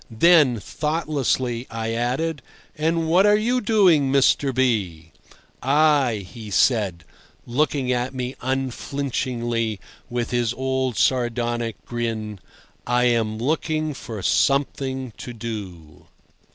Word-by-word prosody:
Then, 135 Hz, -1 st, +4 dB
thoughtlessly, 135 Hz, -, -1 dB
I 115 Hz, 0 st, -3 dB
added: 130 Hz, +6 st, -1 dB, 0.3 s
"And 160 Hz, +1 st, 0 dB
what 180 Hz, +5 st, +4 dB
are 205 Hz, -, +6 dB
you 245 Hz, +4 st, +1 dB
doing, 185 Hz, -, +4 dB
Mr. 140 Hz, 0 st, +3 dB
B 100 Hz, -11 st, -1 dB, 0.3 s
?" -, -, -33 dB
"I," 135 Hz, -6 st, +2 dB
he 110 Hz, +1 st, -10 dB
said, 100 Hz, -4 st, +2 dB, 0.4 s
looking 135 Hz, 0 st, 0 dB
at 125 Hz, +1 st, -1 dB
me 130 Hz, 0 st, -4 dB
unflinchingly, 125 Hz, -4 st, -2 dB, 0.3 s
with 120 Hz, -1 st, -3 dB
his 120 Hz, -1 st, 0 dB
old 130 Hz, -2 st, -1 dB
sardonic 120 Hz, -2 st, 0 dB
grin—"I 115 Hz, +1 st, -4 dB
am 115 Hz, -3 st, +1 dB
looking 155 Hz, +4 st, -1 dB
for 115 Hz, -7 st, -7 dB
something 135 Hz, -2 st, 0 dB
to 125 Hz, -, -7 dB
do." 100 Hz, -9 st, -8 dB
125 Hz, 110 wpm, -23 LUFS, 115-140 Hz, 0.4 s, are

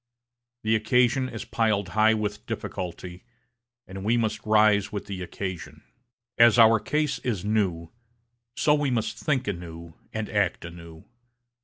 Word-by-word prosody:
The 110 Hz, 0 st, +1 dB
occasion 125 Hz, +3 st, +2 dB
is 110 Hz, -, -7 dB
piled 105 Hz, -5 st, 0 dB
high 110 Hz, +4 st, +3 dB
with 105 Hz, -1 st, -4 dB
difficulty, 90 Hz, 0 st, -6 dB, 0.6 s
and 95 Hz, 0 st, -8 dB
we 115 Hz, +3 st, +2 dB
must 110 Hz, -2 st, -1 dB
rise 105 Hz, -2 st, +4 dB
with 105 Hz, -, -5 dB
the 100 Hz, -2 st, -6 dB
occasion. 90 Hz, -2 st, -6 dB, 0.6 s
As 115 Hz, -1 st, +7 dB
our 115 Hz, -1 st, +7 dB
case 150 Hz, +5 st, -1 dB
is 105 Hz, -7 st, -3 dB
new, 95 Hz, -6 st, -1 dB, 0.6 s
so 150 Hz, -, +3 dB
we 145 Hz, -2 st, +1 dB
must 110 Hz, -2 st, -2 dB
think 130 Hz, +2 st, -1 dB
anew 85 Hz, -3 st, -6 dB, 0.2 s
and 110 Hz, -1 st, -3 dB
act 100 Hz, -5 st, -1 dB
anew. 85 Hz, -1 st, -11 dB
105 Hz, 140 wpm, -26 LUFS, 95-115 Hz, 0.6 s, As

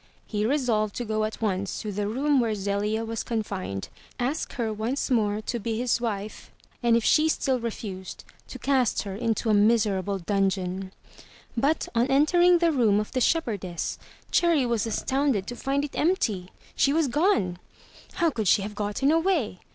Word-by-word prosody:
He 210 Hz, 0 st, -1 dB
resolved 230 Hz, -7 st, +1 dB
to 245 Hz, -, -3 dB
go 215 Hz, 0 st, 0 dB
at 220 Hz, +1 st, -6 dB
once 195 Hz, -2 st, -1 dB
to 210 Hz, -, -3 dB
the 205 Hz, +1 st, -2 dB
room 275 Hz, +6 st, +2 dB
where 225 Hz, -3 st, +1 dB
Zelia 205 Hz, +3 st, -1 dB
was 225 Hz, 0 st, -3 dB
confined, 195 Hz, -, -4 dB, 0.3 s
ask 265 Hz, +6 st, -2 dB
her 225 Hz, -4 st, -2 dB
once 235 Hz, +6 st, -2 dB
more 215 Hz, -3 st, +1 dB
to 235 Hz, +2 st, -3 dB
be 225 Hz, +1 st, -2 dB
his 240 Hz, 0 st, 0 dB
wife, 210 Hz, -3 st, -4 dB, 0.3 s
and 235 Hz, -1 st, +4 dB
if 230 Hz, -, -1 dB
she 310 Hz, +6 st, +4 dB
still 265 Hz, -4 st, +1 dB
refused, 205 Hz, -5 st, -6 dB, 0.2 s
to -, -, -8 dB
cast 265 Hz, -4 st, +1 dB
her 200 Hz, -2 st, -5 dB
into 225 Hz, 0 st, 0 dB
a -, -, +3 dB
miserable 205 Hz, -2 st, +2 dB
dungeon. 190 Hz, 0 st, -1 dB, 0.6 s
But 280 Hz, +7 st, +1 dB
on 235 Hz, +1 st, +2 dB
entering 345 Hz, +6 st, +4 dB
the 340 Hz, -1 st, +3 dB
room 225 Hz, -8 st, +3 dB
of 210 Hz, -, -4 dB
the 255 Hz, -, -1 dB
shepherdess. 205 Hz, -, -1 dB, 0.3 s
Cherry 335 Hz, -6 st, +3 dB
was 235 Hz, -2 st, 0 dB
astounded 260 Hz, -2 st, 0 dB
to 245 Hz, -, -6 dB
find 275 Hz, +3 st, -1 dB
it 290 Hz, -, -9 dB
empty! 225 Hz, -, 0 dB, 0.3 s
She 280 Hz, -, +3 dB
was 320 Hz, -1 st, +2 dB
gone! 240 Hz, -, +1 dB, 0.5 s
How 335 Hz, -3 st, +1 dB
could 220 Hz, -6 st, -2 dB
she 195 Hz, -, +4 dB
have 210 Hz, +1 st, -5 dB
gotten 210 Hz, +7 st, 0 dB
away? 325 Hz, -, +1 dB
225 Hz, 175 wpm, -26 LUFS, 205-270 Hz, 0.6 s, and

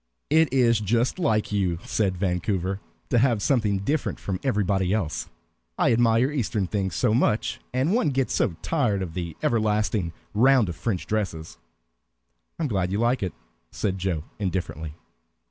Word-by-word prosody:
"It 160 Hz, -2 st, +4 dB
is 120 Hz, -4 st, +4 dB
just 115 Hz, -, 0 dB
like 110 Hz, -13 st, +1 dB
you," 95 Hz, -5 st, +1 dB
said 95 Hz, -4 st, 0 dB
Vancouver, 95 Hz, +1 st, -1 dB, 0.3 s
"to 120 Hz, -, +4 dB
have 120 Hz, -3 st, +3 dB
something 105 Hz, -3 st, +2 dB
different 140 Hz, +10 st, -1 dB
from 95 Hz, -2 st, -3 dB
everybody 100 Hz, -6 st, +1 dB
else. 85 Hz, -7 st, -2 dB, 0.5 s
I -, -, +3 dB
admire 115 Hz, +3 st, +3 dB
Eastern 115 Hz, -7 st, -1 dB
things 95 Hz, -2 st, -2 dB
so 105 Hz, -, +2 dB
much, 115 Hz, 0 st, +1 dB
and 130 Hz, +8 st, +1 dB
one 225 Hz, -10 st, +2 dB
gets 135 Hz, -1 st, 0 dB
so 85 Hz, -, +1 dB
tired 120 Hz, -12 st, +1 dB
of 85 Hz, -3 st, -6 dB
the 85 Hz, -3 st, -5 dB
everlasting 110 Hz, -, +1 dB, 0.2 s
round 125 Hz, -1 st, +4 dB
of 85 Hz, -, -4 dB
French 95 Hz, -1 st, -2 dB
dresses." 95 Hz, -7 st, -3 dB, 1.0 s
"I 165 Hz, -, -2 dB
am -, -, +1 dB
glad 95 Hz, -6 st, -1 dB
you 100 Hz, -, 0 dB
like 120 Hz, +3 st, +1 dB
it," 95 Hz, -3 st, -2 dB, 0.4 s
said 95 Hz, -, -2 dB
Joe, 90 Hz, -5 st, -1 dB, 0.2 s
indifferently. 85 Hz, -5 st, -3 dB
105 Hz, 160 wpm, -25 LUFS, 95-120 Hz, 1.0 s, It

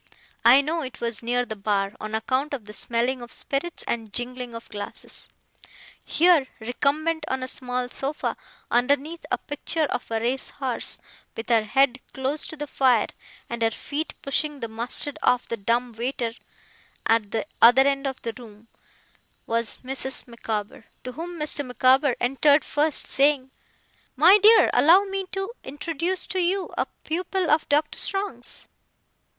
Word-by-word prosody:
I 245 Hz, +4 st, +8 dB
know 320 Hz, +4 st, -2 dB
it 260 Hz, -4 st, -7 dB
was 235 Hz, -2 st, -2 dB
near 245 Hz, +1 st, 0 dB
the 220 Hz, -2 st, -6 dB
bar, 200 Hz, -1 st, -1 dB
on 215 Hz, +1 st, -4 dB
account 260 Hz, +6 st, -1 dB
of 235 Hz, -6 st, -9 dB
the 210 Hz, -, -10 dB
smell 235 Hz, +2 st, -1 dB
of 240 Hz, 0 st, -9 dB
spirits 325 Hz, +5 st, -3 dB
and 225 Hz, -3 st, -3 dB
jingling 245 Hz, +1 st, -5 dB
of 230 Hz, -, -8 dB
glasses. 205 Hz, -1 st, -3 dB, 0.7 s
Here, 330 Hz, -5 st, +4 dB
recumbent 295 Hz, +7 st, 0 dB
on 260 Hz, 0 st, -2 dB
a -, -, -3 dB
small 250 Hz, -1 st, -2 dB
sofa, 275 Hz, +4 st, -3 dB, 0.4 s
underneath 285 Hz, +7 st, +1 dB
a -, -, +1 dB
picture 310 Hz, +2 st, -2 dB
of 255 Hz, -, -4 dB
a 225 Hz, -1 st, 0 dB
race 245 Hz, +4 st, -1 dB
horse, 260 Hz, -4 st, -1 dB, 0.4 s
with 225 Hz, -, -6 dB
her 225 Hz, -2 st, +4 dB
head 265 Hz, +2 st, +3 dB, 0.2 s
close 270 Hz, +3 st, -1 dB
to 315 Hz, -, -8 dB
the 295 Hz, -, -4 dB
fire, 260 Hz, -5 st, +2 dB, 0.4 s
and 235 Hz, 0 st, -5 dB
her 225 Hz, -, +4 dB
feet 290 Hz, +7 st, -4 dB
pushing 290 Hz, +1 st, -1 dB
the 230 Hz, -, -4 dB
mustard 235 Hz, +5 st, -1 dB
off 250 Hz, 0 st, +2 dB
the 230 Hz, -, -2 dB
dumb 235 Hz, +3 st, 0 dB
waiter 235 Hz, 0 st, -2 dB, 0.7 s
at 225 Hz, -2 st, +2 dB
the 225 Hz, +7 st, -2 dB, 0.2 s
other 245 Hz, +3 st, +8 dB
end 275 Hz, 0 st, 0 dB
of 265 Hz, -1 st, -4 dB
the 230 Hz, -, -3 dB
room, 220 Hz, -1 st, -14 dB, 0.8 s
was 230 Hz, 0 st, -1 dB
Mrs. 265 Hz, 0 st, -2 dB
Micawber, 225 Hz, -2 st, -5 dB, 0.2 s
to 255 Hz, -, -5 dB
whom 340 Hz, +5 st, -7 dB
Mr. 300 Hz, -1 st, -2 dB
Micawber 255 Hz, +1 st, +3 dB
entered 280 Hz, +4 st, +3 dB
first, 295 Hz, 0 st, +2 dB
saying, 275 Hz, -1 st, +2 dB, 0.6 s
'My 350 Hz, +9 st, +7 dB
dear, 435 Hz, +3 st, +7 dB
allow 345 Hz, +6 st, +6 dB
me 390 Hz, -1 st, -4 dB
to 390 Hz, +2 st, -2 dB
introduce 330 Hz, +6 st, -1 dB
to 375 Hz, -, -2 dB
you 370 Hz, +2 st, 0 dB
a -, -, 0 dB, 0.2 s
pupil 360 Hz, +2 st, -1 dB
of 305 Hz, +1 st, +2 dB
Doctor 300 Hz, +1 st, +1 dB
Strong's. 390 Hz, -12 st, -3 dB
265 Hz, 160 wpm, -25 LUFS, 235-300 Hz, 0.8 s, I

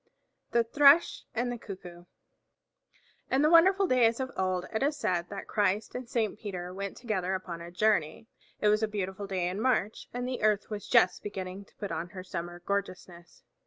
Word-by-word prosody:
THE 235 Hz, -, +3 dB
THRUSH 285 Hz, +7 st, +5 dB
AND 245 Hz, +1 st, 0 dB
THE 240 Hz, -, -5 dB
CUCKOO 180 Hz, -4 st, -10 dB, 1.2 s
In 270 Hz, +2 st, +2 dB
the 305 Hz, -, +4 dB
wonderful 380 Hz, +4 st, +6 dB
days 240 Hz, -6 st, +3 dB
of 260 Hz, 0 st, -3 dB
old 185 Hz, -1 st, -1 dB
it 220 Hz, -, -1 dB
is 290 Hz, +2 st, +1 dB
said 175 Hz, -9 st, -1 dB
that 200 Hz, -1 st, -6 dB
Christ 205 Hz, 0 st, 0 dB
and 250 Hz, -1 st, -6 dB
Saint 220 Hz, -3 st, -1 dB
Peter 180 Hz, -4 st, -6 dB
went 200 Hz, +1 st, -5 dB
together 190 Hz, -6 st, -1 dB
upon 175 Hz, -3 st, -6 dB
a 170 Hz, -, -8 dB
journey. 180 Hz, -1 st, +1 dB, 0.3 s
It 210 Hz, -, +3 dB
was 210 Hz, +1 st, +3 dB
a 220 Hz, -, +2 dB
beautiful 200 Hz, -1 st, -4 dB
day 185 Hz, -2 st, -1 dB
in 185 Hz, +4 st, -3 dB
March, 225 Hz, -4 st, 0 dB
and 245 Hz, +1 st, -3 dB
the 255 Hz, -1 st, -3 dB
earth 210 Hz, 0 st, +1 dB
was 210 Hz, -1 st, -5 dB
just 180 Hz, 0 st, +4 dB
beginning 195 Hz, -1 st, -6 dB
to -, -, -27 dB
put 205 Hz, -4 st, -5 dB
on 170 Hz, +1 st, -3 dB
her 185 Hz, -1 st, -8 dB
summer 175 Hz, -1 st, -6 dB
gorgeousness. 185 Hz, -3 st, -5 dB
200 Hz, 190 wpm, -29 LUFS, 185-235 Hz, 1.2 s, wonderful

